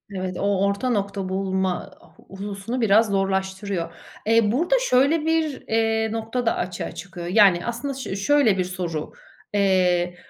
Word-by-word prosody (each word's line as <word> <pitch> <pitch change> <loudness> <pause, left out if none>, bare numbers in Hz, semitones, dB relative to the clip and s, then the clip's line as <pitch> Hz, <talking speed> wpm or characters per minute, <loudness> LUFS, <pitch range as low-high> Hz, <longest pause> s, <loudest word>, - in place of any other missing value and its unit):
Evet, 185 -1 -4
o 200 -1 +1
orta 200 +6 -1
nokta 200 -4 -2
bulma 190 0 -1 0.4
hususunu 200 +5 -5
biraz 220 +1 +4
zorlaştırıyor. 190 -2 -1 0.3
Eee, 225 -1 +3
burada 335 - +2
şöyle 280 +5 +3
bir, 320 -4 0
eee, 225 0 +1
nokta 225 +2 -3
da 230 - +2
açığa 180 -1 -4
çıkıyor. 180 -3 -8
Yani 185 -2 +4
aslında 240 +4 -3
şö 260 -7 -5
şöyle 220 0 +3
bir 185 - +1
soru. 175 -4 -4 0.4
Eee, 180 -3 +2
200 Hz, 140 wpm, -23 LUFS, 190-230 Hz, 0.4 s, biraz